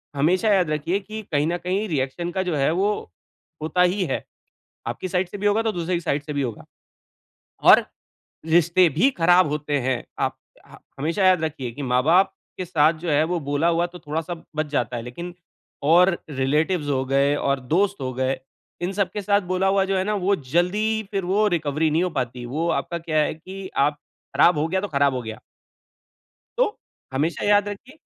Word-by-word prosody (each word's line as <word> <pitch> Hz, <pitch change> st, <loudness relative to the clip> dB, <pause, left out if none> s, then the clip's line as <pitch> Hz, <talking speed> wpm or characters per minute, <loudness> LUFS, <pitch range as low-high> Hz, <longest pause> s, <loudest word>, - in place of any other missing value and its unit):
हमेशा 180 Hz, +9 st, +2 dB
याद 180 Hz, -5 st, +2 dB
रखिए 155 Hz, +6 st, 0 dB
कि 215 Hz, +2 st, -7 dB
कहीं 150 Hz, 0 st, +2 dB
न 175 Hz, -, 0 dB
कहीं 185 Hz, +5 st, -2 dB
रिएक्शन 155 Hz, +4 st, -2 dB
का 190 Hz, -, -1 dB
जो 180 Hz, -4 st, -2 dB
है 140 Hz, +1 st, +2 dB
वो 190 Hz, +4 st, +1 dB, 0.7 s
होता 160 Hz, +3 st, 0 dB
ही 180 Hz, +2 st, +2 dB
है। 135 Hz, -, -2 dB, 0.7 s
आपकी 185 Hz, -, -4 dB
साइड 180 Hz, 0 st, 0 dB
से 205 Hz, -, -8 dB
भी 205 Hz, -, -2 dB
होगा 210 Hz, +2 st, +3 dB
तो 220 Hz, -1 st, 0 dB
दूसरे 175 Hz, +1 st, -2 dB
की 170 Hz, -, 0 dB
साइड 145 Hz, -3 st, -1 dB
से 150 Hz, -, -6 dB
भी 145 Hz, -1 st, -1 dB
होगा 120 Hz, -5 st, -5 dB, 1.1 s
और -, -, +7 dB, 0.6 s
रिश्ते 175 Hz, +2 st, +4 dB
भी 175 Hz, -, +3 dB
ख़राब 175 Hz, +1 st, +5 dB
होते 150 Hz, -1 st, -1 dB
हैं। 130 Hz, -1 st, -1 dB, 0.2 s
आप -, -, 0 dB, 0.3 s
ह -, -, -14 dB, 0.2 s
हमेशा 165 Hz, +7 st, 0 dB
याद 185 Hz, -3 st, +5 dB
रखिए 135 Hz, -6 st, -3 dB
कि 135 Hz, -, -8 dB
माँ-बाप 140 Hz, +9 st, +3 dB, 0.3 s
के 185 Hz, -, -3 dB
साथ 160 Hz, -2 st, +3 dB
जो 170 Hz, -1 st, -4 dB
है 150 Hz, +1 st, +3 dB
वो 175 Hz, +2 st, -1 dB
बोला 145 Hz, +2 st, 0 dB
हुआ 170 Hz, 0 st, +2 dB
तो 175 Hz, 0 st, -12 dB
थोड़ा-सा 160 Hz, +3 st, -4 dB, 0.2 s
बच 155 Hz, 0 st, 0 dB
जाता 125 Hz, -4 st, -1 dB
है। -, -, -4 dB
लेकिन 170 Hz, +9 st, -7 dB, 0.5 s
और 175 Hz, +2 st, +5 dB
रिलेटिव्स 150 Hz, +4 st, 0 dB
हो 130 Hz, -2 st, +1 dB
गए 140 Hz, +2 st, +2 dB
और 140 Hz, -2 st, 0 dB
दोस्त 200 Hz, 0 st, +1 dB
हो 130 Hz, -1 st, -2 dB
गए, 130 Hz, +1 st, -1 dB, 0.4 s
इन 180 Hz, +2 st, -2 dB
सब 200 Hz, -1 st, 0 dB
के 210 Hz, -, -3 dB
साथ 200 Hz, +1 st, +2 dB
बोला 185 Hz, +1 st, +1 dB
हुआ 195 Hz, 0 st, +3 dB
जो 195 Hz, 0 st, 0 dB
है 185 Hz, -, +1 dB
ना 210 Hz, +2 st, -1 dB
वो 200 Hz, +1 st, +4 dB
ज़ल्दी 175 Hz, +8 st, 0 dB, 0.2 s
ही 220 Hz, -, -2 dB
फिर 195 Hz, -2 st, -2 dB
वो 205 Hz, +4 st, +2 dB
रिकवरी 155 Hz, 0 st, 0 dB
नहीं 165 Hz, +4 st, +2 dB
हो 185 Hz, -, 0 dB
पाती। 125 Hz, 0 st, -4 dB
वो 155 Hz, +8 st, -2 dB
आपका 170 Hz, -, -2 dB
क्या 160 Hz, -1 st, -2 dB
है 150 Hz, -, +1 dB
कि, 190 Hz, +4 st, -9 dB
आप 145 Hz, +2 st, +3 dB, 0.4 s
ख़राब 175 Hz, -2 st, +5 dB
हो 150 Hz, +2 st, +1 dB
गया 190 Hz, +3 st, -1 dB
तो 205 Hz, -, -3 dB
ख़राब 140 Hz, -3 st, +2 dB
हो 125 Hz, -, -2 dB
गया। 110 Hz, -1 st, -7 dB, 1.2 s
तो, 485 Hz, -4 st, +1 dB, 0.4 s
हमेशा 150 Hz, +6 st, -1 dB
याद 205 Hz, 0 st, +4 dB
रखिए 250 Hz, +9 st, -10 dB
170 Hz, 205 wpm, -23 LUFS, 145-190 Hz, 1.2 s, और